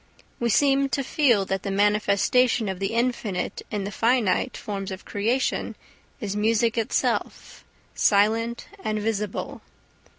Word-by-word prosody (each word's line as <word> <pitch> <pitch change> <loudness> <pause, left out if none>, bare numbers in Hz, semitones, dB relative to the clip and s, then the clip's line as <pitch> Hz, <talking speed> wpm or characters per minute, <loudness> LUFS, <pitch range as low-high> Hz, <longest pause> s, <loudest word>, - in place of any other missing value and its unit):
We 235 - 0
seem 275 +3 +3
to 275 - -1
feel 245 -8 +2
that 190 0 -2
the - - -4
manifestation 210 +4 +2
of 190 -2 -4
the 195 +3 -2
infinite 230 -6 -1
in 205 -2 -3
the 200 - -4
finite 230 +1 +1
forms 195 -1 -5
of 190 0 -8
creation 230 +6 -1 0.4
is 205 -2 -4
music 225 +2 +2
itself, 225 -2 -2 0.3
silent 225 +3 +2 0.2
and 215 0 -1
visible. 210 -1 -3
215 Hz, 130 wpm, -25 LUFS, 200-235 Hz, 0.4 s, seem